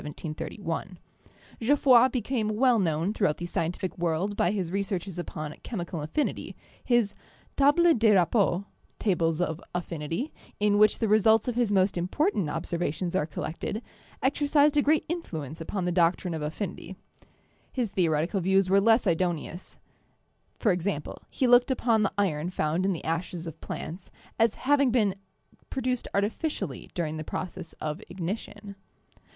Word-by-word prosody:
Geoff 280 +6 +1
roy 250 -2 +8
became 240 -2 -1
well 245 0 +4
known 165 +1 0
throughout 190 -9 +1
the 175 - -5
scientific 175 +2 -2
world 175 +4 0
by 175 - +2
his 185 -4 -2
researches 195 -2 -2
upon 155 -3 -5
chemical 175 -7 -5
affinity; 160 - -2 0.3
his 240 -5 +2 0.4
Tables 310 +5 +5
des 220 -2 +5
Rapports' 190 0 +2 0.3
(tables 165 -5 +1
of 165 -3 -1
affinity), 170 - -3 0.3
in 205 0 +3
which 215 0 +5
the 225 - 0
results 220 +2 +4
of 245 - 0
his 235 -3 +1
most 190 -2 +2
important 190 - 0
observations 170 +3 -2
are 155 -5 +1
collected, 165 +8 -4 0.4
exercized 290 +2 +3
a 290 - +5
great 300 +1 +2
influence 165 - -5
upon 185 +3 -3
the 180 - 0
doctrine 175 0 +2
of 160 - -4
affinity. 175 +4 -5 0.8
His 240 -6 -2
theo 170 -4 +2
retical 170 +6 0
views 190 +1 +2
were 200 +1 +5
less 225 +3 +4
idoneous 175 0 -2 0.4
— - - -23
e.g., 185 -2 +2 0.3
he 265 - 0
looked 245 +1 +6
upon 235 -4 +2
the 205 - +1
iron 175 -5 0
found 175 +1 0
in 195 - +2
the 165 - -6
ashes 170 +1 -3
of 160 -1 -8
plants 175 +3 -6 0.3
as 225 -1 +3
having 280 -1 +4
been 220 -5 +2 0.6
pro 265 - -3
duced 250 -1 -1
artificially 200 - -2
during 160 -3 -2
the 155 - -4
process 170 +2 -6
of 155 +5 -5
ignition. 200 +3 -5
195 Hz, 150 wpm, -27 LUFS, 170-230 Hz, 0.8 s, roy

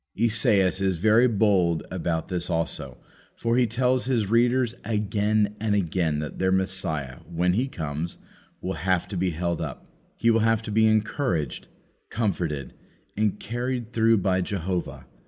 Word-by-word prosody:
Esaias 105 -4 +3
is 95 -2 +1
very 110 +7 +4
bold 100 -7 +2
about 85 -2 -2
this 90 -2 -2
also, 85 -1 -2 0.4
for 115 0 0
he 125 -1 +3
tells 125 +2 +1
his 115 -6 0
readers 120 +1 +3
again 105 -1 0
and 105 -1 0
again 85 -5 0
that 75 0 -5
their 95 0 +2
Messiah, 95 -9 -1
when 90 +1 +1
He 125 +7 +1
comes, 80 - -4 0.4
will 95 - -3
have 95 -1 +1
to 100 - -5
be 90 +1 +1
held 85 +1 -2
up. 75 -6 -6 0.3
He 115 - +3
will 115 - +3
have 115 0 +2
to 110 - -5
be 110 +1 +4
encouraged, 110 - 0 0.4
comforted, 85 - -2 0.4
and 105 -1 0
carried 120 +1 -4
through 115 0 +4
by 95 -1 +1
Jehovah. 90 -8 -3
100 Hz, 155 wpm, -25 LUFS, 85-115 Hz, 0.4 s, very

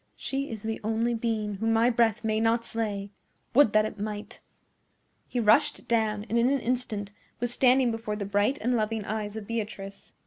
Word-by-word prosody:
"She 275 +1 -3
is 220 -2 -5
the 220 0 -3
only 225 +2 0
being 220 -3 -2
whom 225 +2 +1
my 230 +2 +4
breath 230 -2 +2
may 215 0 +1
not 230 +1 +2
slay! 205 -3 -3 0.4
Would 275 -3 +6
that 215 0 +4
it 215 - -6
might!" 210 0 -5 0.9
He 245 - -2
rushed 220 -1 +3
down, 215 -3 +1
and 230 +3 +1
in 240 +2 +4
an 275 0 +2
instant 230 -5 -2 0.3
was 240 0 -1
standing 255 -1 +4
before 225 -2 -3
the 205 -1 -4
bright 205 +7 +1
and 245 +2 +1
loving 215 -1 -1
eyes 215 0 -3
of 215 - -6
Beatrice. 205 -3 -6
225 Hz, 185 wpm, -27 LUFS, 210-235 Hz, 0.9 s, Would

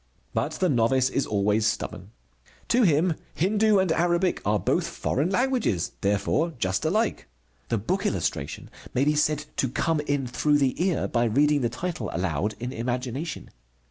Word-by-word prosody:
But - - -1
the 185 - +1
novice 130 -1 +2
is 135 - 0
always 105 +1 +1
stubborn. 105 - -3 0.6
To 245 - +4
him 165 -3 +3 0.2
Hindu 210 +4 +3
and 190 -3 +2
Arabic 175 +2 +1
are 105 0 +2
both 95 - 0
foreign 145 +6 -1
languages, 235 - 0
therefore 105 - +1
just 95 -4 -1
alike. 215 +8 0 0.4
The 115 - +1
book 190 - -1
illustration 70 - -3 0.2
may 130 +3 +3
be 150 - +3
said 150 0 +1
to 130 - +1
come 160 +5 0
in 145 -2 -1
through 145 +4 +2
the 140 +4 +1
ear, 185 -2 +1
by 120 0 +1
reading 145 +5 +3
the 120 - +1
title 125 -2 -4
aloud 95 +4 -1
in 125 +2 -4
imagination. 125 +6 -4
145 Hz, 160 wpm, -26 LUFS, 115-175 Hz, 0.6 s, To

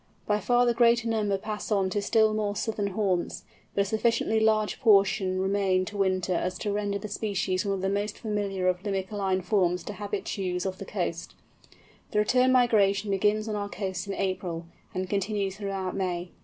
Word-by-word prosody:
By 210 0 +1
far 245 +2 +3
the 240 - +3
greater 235 0 +4
number 210 -3 +1
pass 215 +2 -5
on 195 -2 +2
to 205 - 0
still 220 +1 +3
more 210 -1 -1
southern 210 -1 -1
haunts, 190 -3 -1 0.3
but 200 - +3
a - - +1
sufficiently 220 +1 +1
large 215 -1 +2
portion 195 -4 +4
remain 190 -1 +1
to 210 - -8
winter 185 -2 +1
as 180 +1 -1
to 205 - -2
render 205 0 -1
the 215 - -6
species 200 -2 -1
one 200 -1 0
of 190 - -5
the 190 - 0
most 205 +2 -1
familiar 200 -4 -2
of 180 0 +1
Limicoline 195 -1 -1
forms 180 -4 +1
to 210 - -6
habitues 195 -3 -3
of 190 -1 -3
the 195 - -6
coast. 175 -3 -4 0.7
The - - -3
return 250 +5 +4
migration 210 -5 +3
begins 210 +2 +1
on 215 - -2
our 205 -1 -3
coasts 190 -2 -4
in 195 - -3
April, 185 -3 -2 0.3
and 185 0 -3
continues 200 0 -1
throughout 195 -2 -3
May. 180 -2 -2
200 Hz, 185 wpm, -27 LUFS, 190-215 Hz, 0.7 s, greater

